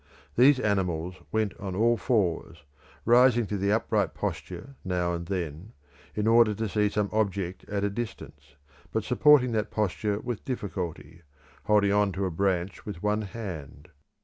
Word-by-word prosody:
These 130 +2 +6
animals 90 -5 0 0.2
went 110 -2 0
on 95 -2 -5
all 115 +4 +3
fours, 90 - -1 0.4
rising 120 0 +5
to 105 - -3
the 100 +1 0
upright 110 +2 +1
posture 135 +6 -5
now 90 -2 -1
and 85 0 -5
then, 90 0 -4 0.4
in 105 - -1
order 115 -1 +5
to 110 +2 -2
see 105 0 +1
some 105 0 0
object 100 -4 -1
at 100 -1 -1
a 100 - +1
distance, 115 -8 -7 0.4
but 110 - -1
supporting 125 0 +5
that 110 -2 -1
posture 105 0 -1
with 120 -1 -5
difficulty, 90 - -5 0.4
holding 105 -2 +3
on 105 -1 +3
to 95 +1 -2
a 95 - -2
branch 95 +1 -1
with 100 -4 -7
one 105 +1 +1
hand. 90 -9 -7
105 Hz, 155 wpm, -27 LUFS, 90-110 Hz, 0.4 s, These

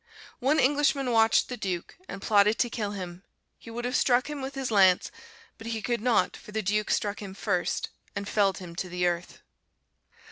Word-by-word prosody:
One 280 +4 +2
Englishman 280 -1 +2
watched 225 -1 +4
the 250 - -5
Duke, 185 -5 -4
and 195 0 -7
plotted 210 0 +4
to 240 - +1
kill 210 -3 -3
him; 180 -2 -7 0.4
he - - -12
would 240 +1 -5
have 250 +2 -1
struck 255 +3 +2
him 290 -2 -5
with 265 +1 -5
his 270 -3 -3
lance, 190 -3 +4 0.5
but 225 - -8
he 230 -1 -2
could 240 -3 -1
not, 225 -6 +2
for 210 - -12
the 220 0 -2
Duke 210 +2 0
struck 205 0 0
him 195 -2 -8
first, 195 -3 -1 0.3
and 200 0 -4
felled 200 -2 +2
him 175 -2 -9
to 185 - -3
the 180 0 -1
earth. 175 0 -2
210 Hz, 200 wpm, -27 LUFS, 190-245 Hz, 0.5 s, watched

